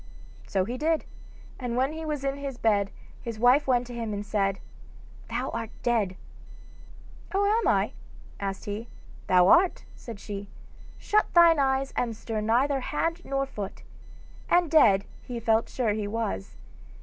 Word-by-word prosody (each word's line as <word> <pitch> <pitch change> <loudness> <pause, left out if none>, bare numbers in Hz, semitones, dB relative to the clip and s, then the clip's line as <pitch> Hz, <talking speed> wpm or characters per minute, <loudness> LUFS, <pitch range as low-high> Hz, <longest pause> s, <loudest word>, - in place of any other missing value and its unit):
So 190 -2 +1
he 245 +4 -5
did, 320 +1 +1 0.5
and 245 -2 -3
when 265 +4 +1
he 320 0 -6
was 300 -3 -3
in 275 0 -1
his 275 -3 -5
bed 205 -4 +2 0.3
his 230 -2 -5
wife 250 +6 +4
went 250 -1 +2
to 245 - -9
him 230 -3 -3
and 205 +1 -5
said: 195 -2 0 0.7
'Thou 245 +3 -2
art 230 -1 -4
dead.' 220 -6 +1 1.2
'Oh, 400 +1 +3
am 440 +3 +2
I?' - - +2 0.5
asked 195 -1 -4
he. 210 +3 -5 0.4
'Thou 180 -1 +5
art,' 350 - +4
said 230 -4 -9
she; 200 -1 -7 0.5
'shut 425 0 +1
thine 335 -2 +7
eyes 270 0 +1
and 230 -2 -1
stir 220 -1 -3
neither 255 +6 +2
hand 330 +6 -2
nor 275 0 -1
foot.' 210 -7 -7 0.7
And 350 -3 +3
dead 205 -11 +5 0.2
he 245 -2 -6
felt 225 0 +2
sure 230 -5 0
he 210 -1 -2
was. 210 - -3
240 Hz, 160 wpm, -27 LUFS, 210-275 Hz, 1.2 s, thine